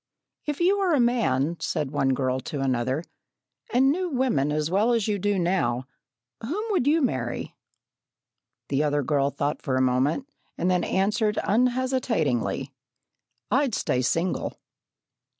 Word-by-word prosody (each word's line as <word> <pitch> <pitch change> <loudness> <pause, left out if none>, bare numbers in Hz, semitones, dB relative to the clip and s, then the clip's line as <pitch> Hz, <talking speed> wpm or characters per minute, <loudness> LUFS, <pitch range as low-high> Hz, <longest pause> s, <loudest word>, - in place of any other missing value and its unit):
"If 295 -1 -2
you 380 +4 +3
were 375 -4 +2
a - - +2
man," 170 - +1
said 150 -5 -2
one 135 -2 +1
girl 130 0 0
to 140 +2 -5
another, 130 +3 0 0.7
"and 265 +3 +4
knew 360 +3 -1
women 250 - +1
as 150 +2 -1
well 215 +6 +3
as 225 -3 +1
you 205 -2 0
do 205 +1 +1
now, 170 -9 0 0.6
whom 325 - -3
would 360 -10 +1
you 315 +1 +3
marry?" 120 - -2 1.1
The 140 +1 +1
other 145 -1 +1
girl 140 0 +1
thought 145 +1 -2
for 135 -3 -1
a 130 - +2
moment, 130 - +1 0.3
and 180 +2 +1
then 180 -1 +2
answered 210 +3 +1
unhesitatingly: 230 - 0 0.8
"I'd 265 -1 +2
stay 125 - 0
single." 165 +8 -1
180 Hz, 145 wpm, -25 LUFS, -, 1.1 s, and